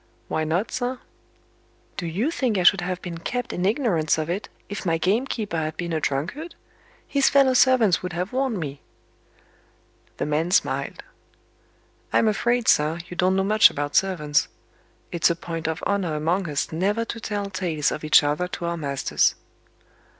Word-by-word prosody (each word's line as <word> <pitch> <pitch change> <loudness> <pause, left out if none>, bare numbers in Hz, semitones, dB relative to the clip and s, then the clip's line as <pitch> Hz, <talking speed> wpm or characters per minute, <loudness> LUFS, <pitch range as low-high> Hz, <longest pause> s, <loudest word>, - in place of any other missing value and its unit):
"Why 155 - -1
not, 170 +7 -1
sir?" 250 +1 -2 1.0
"Do 175 - -4
you 205 - -1
think 250 -10 0
I 180 - +1
should 180 +1 +5
have 180 0 -3
been 170 -2 -6
kept 245 +7 -3
in 180 +2 0
ignorance 200 - +1
of 155 +1 -2
it, 195 +4 -4 0.2
if 205 - -6
my 165 -2 +1
gamekeeper 210 +2 -1
had 155 0 -3
been 170 -1 -3
a 160 - +1
drunkard? 180 - -3 0.5
His 280 -1 +3
fellow 275 -2 +4
servants 250 -8 +4
would 180 -1 -5
have 180 +5 -3
warned 260 -5 0
me." 145 -3 -6 1.4
The - - -2
man 150 +3 0
smiled. 185 - 0 1.1
"I'm 225 - +3
afraid, 235 +3 +1
sir, 150 +2 +3
you 175 - -7
don't 185 +2 +2
know 195 - +2
much 215 +2 +6
about 145 0 -4
servants. 150 -6 +2 0.6
It's 170 -1 +3
a 170 - +1
point 165 -1 -5
of 160 0 -3
honor 185 -6 0
among 165 +4 0
us 145 -1 -2
never 200 +8 0
to 230 - -6
tell 205 -2 -4
tales 170 -6 -1
of 155 - -5
each 155 0 +6
other 150 +5 0
to 175 - -5
our 170 0 -2
masters." 140 -4 +1
180 Hz, 170 wpm, -24 LUFS, 160-215 Hz, 1.4 s, much